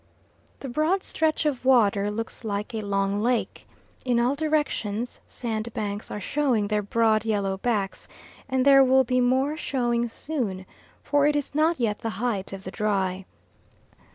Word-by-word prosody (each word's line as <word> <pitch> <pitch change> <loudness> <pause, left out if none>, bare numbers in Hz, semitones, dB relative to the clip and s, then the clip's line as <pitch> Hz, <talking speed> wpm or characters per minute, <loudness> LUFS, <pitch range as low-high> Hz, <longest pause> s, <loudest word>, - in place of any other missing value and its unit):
The 275 - -5
broad 310 +9 +1
stretch 315 0 0
of 280 -5 -1
water 210 -6 +4
looks 225 +3 -5
like 210 +2 -3
a 220 - -2
long 200 0 0
lake. 240 +1 -1 0.4
In 245 -2 +1
all 245 +3 +2
directions 285 -7 -1
sandbanks 215 -3 -4
are - - -5
showing 240 -2 0
their 210 -1 +1
broad 215 +1 +2
yellow 200 -3 -1
backs, 200 -4 -2 0.4
and 260 0 +1
there 275 -1 +8
will 265 0 +5
be 255 0 +1
more 260 +4 +2
showing 240 -6 0
soon, 225 -7 -3 0.4
for 290 0 +3
it 295 - +2
is 290 -1 -2
not 315 +1 +2
yet 215 -4 0
the 225 - -3
height 215 -5 -2
of 195 -1 -7
the 185 - -6
dry. 195 -3 -1
235 Hz, 155 wpm, -25 LUFS, 205-265 Hz, 0.4 s, there